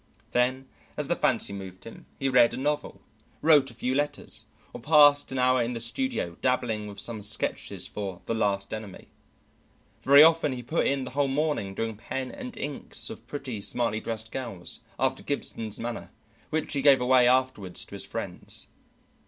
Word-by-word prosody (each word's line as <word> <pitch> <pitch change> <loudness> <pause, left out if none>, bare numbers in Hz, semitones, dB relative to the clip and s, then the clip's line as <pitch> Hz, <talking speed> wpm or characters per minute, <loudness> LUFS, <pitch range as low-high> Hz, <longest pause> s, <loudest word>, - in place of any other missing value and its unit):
Then, 130 +2 +1 0.3
as - - -1
the - - +3
fancy - - 0
moved 95 -1 -8
him, 115 - -11
he 135 - -1
read 125 -3 +5
a - - -6
novel, 150 +2 -2 0.4
wrote 150 -4 +6
a 120 - -12
few 125 +2 -1
letters, 145 +2 -2 0.3
or 120 - -8
passed 145 0 +6
an 135 - -3
hour 130 0 +3
in 120 +1 -1
the 115 - -3
studio 115 - -2
dabbling 120 -5 0
with 100 -1 -7
some 110 +1 -2
sketches 105 +1 -1
for 95 -4 -6
the - - -1
"Last 100 -3 0
Enemy." 110 -3 -8 0.9
Very 140 +2 +8
often 160 -3 +4
he 125 -1 -6
put 155 +8 0
in 140 -1 0
the 125 - -6
whole 140 +2 +1
morning 135 -8 -1
doing 110 0 -3
pen 130 +3 -4
and 255 -3 -8
inks 145 -1 -3
of - - -11
pretty, 130 -7 -5
smartly 110 +1 -1
dressed 110 0 -5
girls, 110 -9 -6 0.2
after - - +1
Gibson's 110 -2 -3
manner, 120 0 -5 0.4
which 155 -1 -2
he 140 - 0
gave 140 -1 +6
away 125 0 +5
afterward 125 -7 +1
to - - -5
his - - -4
friends. - - -6
125 Hz, 175 wpm, -27 LUFS, 110-140 Hz, 0.9 s, Very